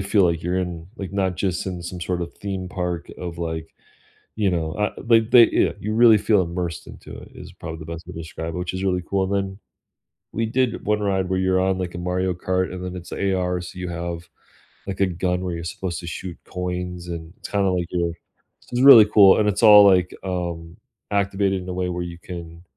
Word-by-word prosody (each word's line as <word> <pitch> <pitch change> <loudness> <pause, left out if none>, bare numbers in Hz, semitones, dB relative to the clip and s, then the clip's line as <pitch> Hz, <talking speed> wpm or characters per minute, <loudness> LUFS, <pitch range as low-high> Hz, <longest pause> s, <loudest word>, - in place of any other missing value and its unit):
feel 100 0 +3
like 85 -1 0
you're 90 +2 -1
in 90 -3 -3
like, 95 -1 -6
not 95 -2 0
just 90 0 -2
in 90 -2 -4
some 90 +1 -7
sort 90 0 -2
of 85 - -6
theme 95 -2 -5
park 90 -2 -4
of, 85 -2 -6
like, 80 -1 -5 0.6
you 100 -3 +2
know 80 -3 -1
uh, 105 +2 -1
they 115 -1 +5
they 115 +1 +6
yeah, - - +2
you 105 +1 -3
really 115 -2 +7
feel 105 -1 +3
immersed 85 -1 -4
into - - -11
it, - - -11
is - - -11
probably 80 -1 -8
the 80 - -9
best 85 0 -7
way 90 - -9
to 80 - -8
describe 80 0 -6
it, - - -3
which 90 +1 -4
is 95 - -3
really 90 -2 0
cool, 95 -1 +1
and 95 - -3
then 95 0 -2 0.7
we 115 - -1
did 125 +1 0
one 105 0 +1
ride 95 -2 0
where 95 - +1
you're 95 0 +2
on, 95 0 +1
like, 90 -2 -4
a - - -5
Mario 90 +1 -1
Kart 95 +1 -1
and 90 0 -6
then 90 0 -5
it's 90 -1 -9
AR, 90 -2 0
so 90 +1 -9
you 90 -1 -4
have, 85 0 -5 0.6
like, 100 -1 -5
a 95 - +4
gun 90 0 -1
where 90 -2 -3
you're 85 - -6
supposed 85 +1 -4
to 85 - -8
shoot 85 +1 -6
coins, 90 -1 -5
and 85 0 -7
it's - - -8
kinda, 100 -2 +1
like, 90 -1 0
you're 85 -1 0
i - - -9 0.6
it's 125 0 0
really 130 -6 +10
cool, 100 -2 +6
and 105 - +2
it's 100 +2 0
all, 105 -2 +9
like, 95 -2 +4
um, 85 -2 -4 0.4
activated 100 -1 0
in 90 - -8
a - - -3
way 90 0 -1
where 90 0 -3
you 85 -1 -7
can 85 -1 -9
90 Hz, 235 wpm, -23 LUFS, 85-95 Hz, 0.7 s, really